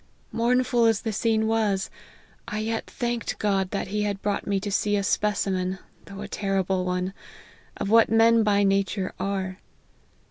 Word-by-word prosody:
Mournful 240 Hz, 0 st, +2 dB
as 225 Hz, -2 st, +3 dB
the 220 Hz, -, -2 dB
scene 220 Hz, 0 st, +1 dB
was, 215 Hz, -3 st, 0 dB, 0.6 s
I 210 Hz, -, -4 dB
yet 225 Hz, +1 st, -2 dB
thanked 240 Hz, -1 st, -3 dB
God 195 Hz, -3 st, 0 dB
that 195 Hz, -1 st, -3 dB
he 210 Hz, +1 st, -1 dB
had 205 Hz, -1 st, -2 dB
brought 205 Hz, -1 st, -1 dB
me 200 Hz, -1 st, +1 dB
to 205 Hz, 0 st, -4 dB
see 205 Hz, +1 st, +1 dB
a 200 Hz, -, 0 dB
specimen, 190 Hz, -2 st, 0 dB, 0.3 s
though 195 Hz, 0 st, -9 dB
a 205 Hz, -, -5 dB
terrible 190 Hz, -2 st, -1 dB
one, 180 Hz, +1 st, -2 dB, 0.6 s
of 200 Hz, -, -3 dB
what 230 Hz, 0 st, +6 dB
men 225 Hz, 0 st, +5 dB
by 205 Hz, -1 st, +3 dB
nature 195 Hz, -1 st, 0 dB
are. 190 Hz, -1 st, -3 dB
205 Hz, 165 wpm, -25 LUFS, 195-225 Hz, 0.6 s, what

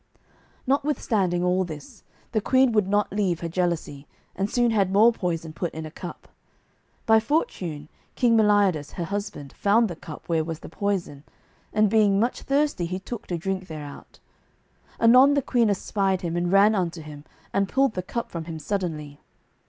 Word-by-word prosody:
Notwithstanding 225 Hz, -10 st, 0 dB
all 180 Hz, +1 st, +2 dB
this 155 Hz, -5 st, -9 dB, 0.3 s
the 220 Hz, -2 st, 0 dB
queen 260 Hz, +3 st, +3 dB
would 210 Hz, -4 st, +2 dB
not 205 Hz, 0 st, +1 dB
leave 190 Hz, -5 st, 0 dB
her 170 Hz, -, -2 dB
jealousy, 165 Hz, -5 st, -2 dB, 0.3 s
and 195 Hz, +2 st, -1 dB
soon 240 Hz, 0 st, +2 dB
had 200 Hz, -4 st, +2 dB
more 220 Hz, +4 st, +5 dB
poison 165 Hz, -6 st, -3 dB
put 170 Hz, +1 st, -3 dB
in 160 Hz, 0 st, -5 dB
a 155 Hz, -, -8 dB
cup. 175 Hz, +1 st, -9 dB, 0.8 s
By 220 Hz, 0 st, +6 dB
fortune 180 Hz, -, -2 dB, 0.3 s
King 240 Hz, -3 st, +3 dB
Meliodas, 205 Hz, -8 st, +3 dB
her 175 Hz, -, -4 dB
husband, 180 Hz, -7 st, -5 dB
found 220 Hz, +3 st, +3 dB
the 175 Hz, -, -6 dB
cup 155 Hz, -2 st, -11 dB
where 165 Hz, -2 st, +1 dB
was 160 Hz, 0 st, -6 dB
the -, -, -9 dB
poison, 180 Hz, -6 st, -3 dB, 0.5 s
and 215 Hz, 0 st, +3 dB
being 205 Hz, -2 st, +3 dB
much 235 Hz, +3 st, 0 dB
thirsty 275 Hz, -, 0 dB
he 185 Hz, +2 st, -3 dB
took 205 Hz, +4 st, -7 dB
to 175 Hz, -, -2 dB
drink 185 Hz, +2 st, -3 dB
thereout. 150 Hz, -3 st, -9 dB, 0.8 s
Anon 255 Hz, +5 st, +6 dB
the 280 Hz, -, +2 dB
queen 235 Hz, -4 st, +2 dB
espied 195 Hz, -1 st, 0 dB
him 170 Hz, -1 st, -3 dB
and 175 Hz, 0 st, 0 dB
ran 200 Hz, +2 st, +6 dB
unto 175 Hz, -5 st, -2 dB
him 150 Hz, -1 st, -10 dB, 0.3 s
and 195 Hz, -1 st, +1 dB
pulled 270 Hz, -3 st, +2 dB
the 185 Hz, -, -2 dB
cup 235 Hz, +6 st, -5 dB
from 165 Hz, -2 st, -5 dB
him 165 Hz, -1 st, -6 dB
suddenly. 155 Hz, -5 st, -4 dB
190 Hz, 175 wpm, -25 LUFS, 165-220 Hz, 0.8 s, By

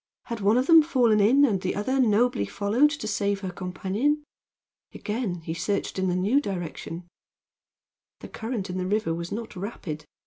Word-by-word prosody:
Had 235 Hz, -2 st, -5 dB
one 205 Hz, +4 st, +3 dB
of 255 Hz, -, +2 dB
them 330 Hz, +1 st, +8 dB
fallen 250 Hz, -9 st, +3 dB
in, 255 Hz, +8 st, +5 dB
and 200 Hz, -8 st, 0 dB
the 185 Hz, -, -2 dB
other 260 Hz, +7 st, -1 dB
nobly 225 Hz, -, +2 dB
followed 210 Hz, -, +2 dB
to 285 Hz, -7 st, -5 dB
save 200 Hz, -1 st, -1 dB
her 190 Hz, -2 st, -4 dB
companion? 195 Hz, +12 st, -1 dB, 0.7 s
Again 210 Hz, -6 st, -3 dB
he 160 Hz, 0 st, -4 dB
searched 190 Hz, +3 st, -2 dB
in 190 Hz, -, +1 dB
the 180 Hz, -, 0 dB
new 210 Hz, +10 st, +2 dB
direction. 175 Hz, -, -5 dB, 1.1 s
The -, -, -8 dB
current 225 Hz, -3 st, -4 dB
in 185 Hz, -, -3 dB
the 185 Hz, -, -2 dB
river 205 Hz, -4 st, 0 dB
was 170 Hz, +1 st, -5 dB
not 220 Hz, 0 st, -5 dB
rapid. 180 Hz, -6 st, -6 dB
205 Hz, 175 wpm, -26 LUFS, 185-245 Hz, 1.1 s, them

